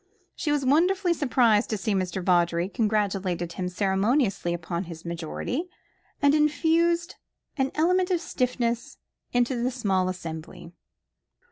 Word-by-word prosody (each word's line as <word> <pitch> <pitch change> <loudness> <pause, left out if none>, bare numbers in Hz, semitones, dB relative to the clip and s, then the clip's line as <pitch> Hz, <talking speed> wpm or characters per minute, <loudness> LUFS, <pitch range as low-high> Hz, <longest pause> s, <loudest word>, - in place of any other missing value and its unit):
She 300 - -2
was 290 -2 +1
wonderfully 350 +6 +3
surprised 245 -8 +2
at 215 - -1
seeing 205 -1 0
Mr. 185 0 -3
Vawdrey, 175 0 +2
congratulated 195 -5 -1
him 180 -1 -3
ceremoniously 195 +1 +1
upon 170 +1 -3
his 165 -1 -10
majority, 170 - -4 0.5
and 285 0 +5
infused 330 +3 +2 0.4
an 265 -2 0
element 360 +4 +2
of 360 -2 +2
stiffness 245 -6 -2 0.3
into 245 0 +1
the 250 - +1
small 195 -7 0
assembly. 165 -2 -7
225 Hz, 125 wpm, -26 LUFS, 180-295 Hz, 0.5 s, and